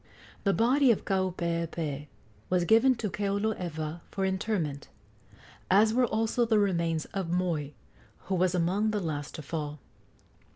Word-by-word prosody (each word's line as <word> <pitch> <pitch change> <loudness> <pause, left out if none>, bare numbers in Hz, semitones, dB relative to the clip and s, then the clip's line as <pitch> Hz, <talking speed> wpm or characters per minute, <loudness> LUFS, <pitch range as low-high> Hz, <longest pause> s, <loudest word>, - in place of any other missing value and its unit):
The 200 - +4
body 255 +5 +4
of 230 - +2
Kaupeepee 170 -5 -2 0.4
was 180 -1 +2
given 230 +6 +5
to 220 -3 -3
Keoloewa 180 -6 -2
for 195 -1 -2
interment, 190 -7 -2 0.8
as 215 +3 +5
were 250 +1 +3
also 225 +2 +1
the 225 -2 +3
remains 170 -6 +1
of 190 -4 -2
Moi, 170 -4 0 0.5
who 195 - -4
was 185 0 +2
among 185 +5 +1
the 210 -1 0
last 150 -5 -4
to 155 - -7
fall. 150 0 -4
185 Hz, 135 wpm, -29 LUFS, 165-215 Hz, 0.8 s, given